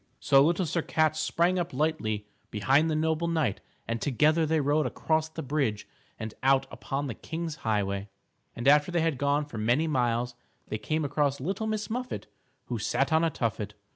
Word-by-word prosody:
So 135 0 +5
Little 175 +4 +2
Sir 170 +2 0
Cat 155 -1 +1
sprang 170 +3 +1
up 175 -1 -3
lightly 110 -8 -1 0.2
behind 135 +9 +3
the 155 - 0
noble 160 +1 +1
knight 160 - 0 0.3
and 115 0 -2
together 155 +4 +3
they 160 +1 +2
rode 145 0 +2
across 160 +4 0
the 160 0 -6
bridge 135 -7 -1 0.3
and 110 -1 -6
out 135 0 +4
upon 140 +1 -3
the 130 - -3
King's 160 +6 -5
Highway. 100 -2 -1 0.5
And 120 +3 -3
after 150 +3 +5
they 175 -1 +1
had 160 -5 0
gone 145 +1 +1
for 120 -7 -7
many 120 +9 +2
miles, 120 -4 0 0.4
they 110 - -3
came 155 +8 -1
across 145 -1 0
Little 195 +10 -2
Miss 215 -1 -2
Muffet 250 +3 -4 0.4
who - - -3
sat - - 0
on 160 +1 +4
a 165 - +3
tuffet. 110 -6 -3
150 Hz, 185 wpm, -28 LUFS, 120-160 Hz, 0.5 s, So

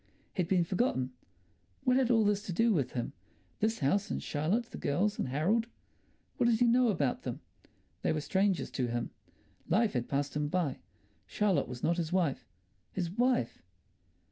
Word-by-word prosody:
He'd 180 -3 0
been 185 -1 +3
forgotten. 165 - 0 0.7
What 255 - +3
had 260 -3 +2
all 225 -3 +4
this 205 -1 +2
to - - -2
do 225 +5 +3
with 135 -8 0
him—this 215 - -4
house 195 +9 +1
and - - -3
Charlotte, 190 +11 -1
the - - -7
girls 200 +9 0
and - - 0
Harold—what 220 - -2
did 225 -2 +3
he 245 - +5
know 245 +1 +4
about 150 - 0
them? - - -4 0.6
They - - +1
were 155 - 0
strangers 190 +2 +1
to 125 -2 -1
him. 120 0 -2 0.6
Life 215 +6 +3
had 125 -2 -2
passed 140 +1 -1
him 150 0 0
by. 160 -4 -1 0.5
Charlotte 195 -9 +1
was 125 -1 -8
not 170 +1 +2
his 165 -1 -2
wife. 175 -7 0 0.4
His 175 -3 -2
wife! 240 - +1
180 Hz, 170 wpm, -31 LUFS, 145-220 Hz, 0.7 s, he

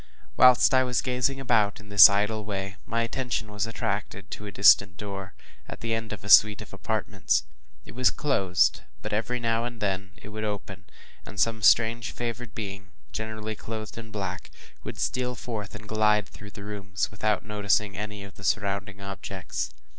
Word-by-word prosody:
Whilst 125 +1 +6
I 130 0 +5
was 125 -2 0
gazing 130 +2 0
about 115 -6 +1
in 105 -1 -15
this 105 +1 +10
idle 105 +2 0
way, 100 -1 -4
my 115 +1 0
attention 115 -3 -3
was 105 +2 -2
attracted 100 -3 -4
to 105 - -6
a - - -6
distant 90 -1 +5
door, 100 -1 -7 0.3
at - - -8
the 115 0 -1
end 115 -1 -3
of 110 - -7
a 105 - -7
suite 105 0 +7
of - - -16
apartments. - - -1 0.4
It - - -11
was 125 0 +3
closed, 95 -13 +1 0.2
but - - -4
every 115 +4 -1
now 115 -1 0
and 120 -1 -5
then 95 -2 -2
it - - -12
would 110 +1 -6
open, 105 -2 -5 0.4
and 105 - -9
some 115 0 +1
strange 115 +1 +4
favored 120 -1 -5
being, 100 -2 -6 0.2
generally 110 0 -4
clothed 110 0 -7
in 115 -1 -9
black, 95 -3 -5 0.3
would - - -6
steal 125 0 -1
forth, 110 -4 -6
and 105 0 -10
glide 105 -1 +2
through 100 +2 -12
the 100 0 -10
rooms, 100 -3 -3
without 105 -2 -1
noticing 105 -1 0
any 105 0 -5
of 100 -1 -11
the 95 - -13
surrounding 100 -1 -1
objects. 100 -1 -5
105 Hz, 180 wpm, -26 LUFS, 100-115 Hz, 0.4 s, this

